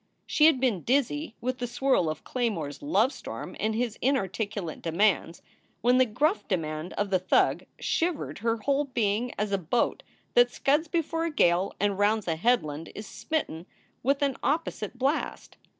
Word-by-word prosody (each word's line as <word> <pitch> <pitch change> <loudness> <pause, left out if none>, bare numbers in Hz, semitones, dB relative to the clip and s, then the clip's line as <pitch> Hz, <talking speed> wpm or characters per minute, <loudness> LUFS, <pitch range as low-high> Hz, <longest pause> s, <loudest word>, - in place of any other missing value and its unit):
She 305 - +5
had 310 -5 +4
been 240 -9 +1
dizzy 280 - 0
with 255 +1 -2
the 245 - -2
swirl 245 -8 +1
of 155 - -5
Claymore 220 - -1
s 145 - -10
lovestorm 290 -2 -1
and 215 0 0
his 235 -1 -2
inarticulate 205 - -1
demands, 170 0 +1 0.4
when 250 +2 +4
the 255 - +5
gruff 305 - 0
demand 155 -2 -2
of 205 -1 -2
the 185 - +3
thug 185 - +2
shivered 335 -2 -1
her 230 +2 0
whole 280 +6 +1
being 235 -2 0
as 210 0 -1
a 195 - +1
boat 185 +8 0 0.3
that 245 0 +6
scuds 295 +6 +1
before 330 0 -1
a 335 - -1
gale 180 - +2
and 205 -1 0
rounds 210 0 +2
a 165 - +1
headland 160 -6 0
is 210 - -6
smitten 195 - -3 0.3
with 275 +3 +1
an 275 -2 0
opposite 280 -7 -2
blast. 275 +5 -2
235 Hz, 165 wpm, -27 LUFS, 195-275 Hz, 0.4 s, that